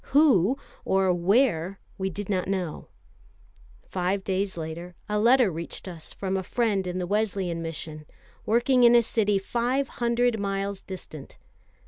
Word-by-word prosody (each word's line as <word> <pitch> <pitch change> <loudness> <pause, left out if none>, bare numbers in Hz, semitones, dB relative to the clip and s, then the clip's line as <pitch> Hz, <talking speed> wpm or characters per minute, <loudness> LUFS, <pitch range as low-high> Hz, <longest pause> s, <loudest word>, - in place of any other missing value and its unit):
Who, 260 - +5 0.3
or 190 -1 +2
where, 190 -1 +2 0.2
we 190 0 0
did 195 +2 -6
not 185 -3 -1
know. 185 -5 -3 1.0
Five 190 +1 -1
days 190 -1 -1
later, 170 +2 -6
a 210 0 0
letter 240 -1 +5
reached 170 +3 -6
us 170 -4 -7
from 190 -1 -3
a - - -1
friend 200 -1 0
in 180 0 -3
the 180 - -1
Wesleyan 195 -4 -1
Mission, 155 -2 -6 0.4
working 240 +3 +3
in 240 0 +7
a 235 - +6
city 210 -3 +1
five 245 +7 0
hundred 235 -1 +2
miles 195 0 -2
distant. 155 -6 -9
195 Hz, 145 wpm, -26 LUFS, 180-230 Hz, 1.0 s, in